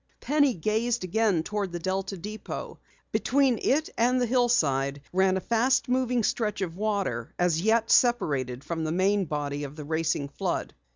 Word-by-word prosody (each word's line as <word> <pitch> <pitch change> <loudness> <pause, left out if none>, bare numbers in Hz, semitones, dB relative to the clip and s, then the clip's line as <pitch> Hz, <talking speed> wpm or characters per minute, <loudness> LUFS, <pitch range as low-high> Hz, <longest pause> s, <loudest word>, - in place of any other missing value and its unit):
Penny 285 -3 +2
gazed 220 +6 0
again 185 -2 +1
toward 205 -1 -3
the 175 - -3
Delta 190 +2 -3
depot. 210 +5 -7 0.3
Between 265 -3 +2
it 305 +4 +2
and 250 +2 +3
the 245 - +2
hillside 155 - +1
ran 190 0 +3
a - - 0
fast 235 +6 +1
moving 250 -2 +1
stretch 210 -2 -1
of 175 -3 -3
water, 195 - -2 0.2
yet 220 +7 +2
separated 140 - +2
from 165 -1 -3
the 155 - -1
main 190 +3 +2
body 145 -2 -3
of 145 0 -7
the 150 -2 -8
racing 160 -2 -1
flood. - - -3
195 Hz, 160 wpm, -27 LUFS, 160-235 Hz, 0.3 s, and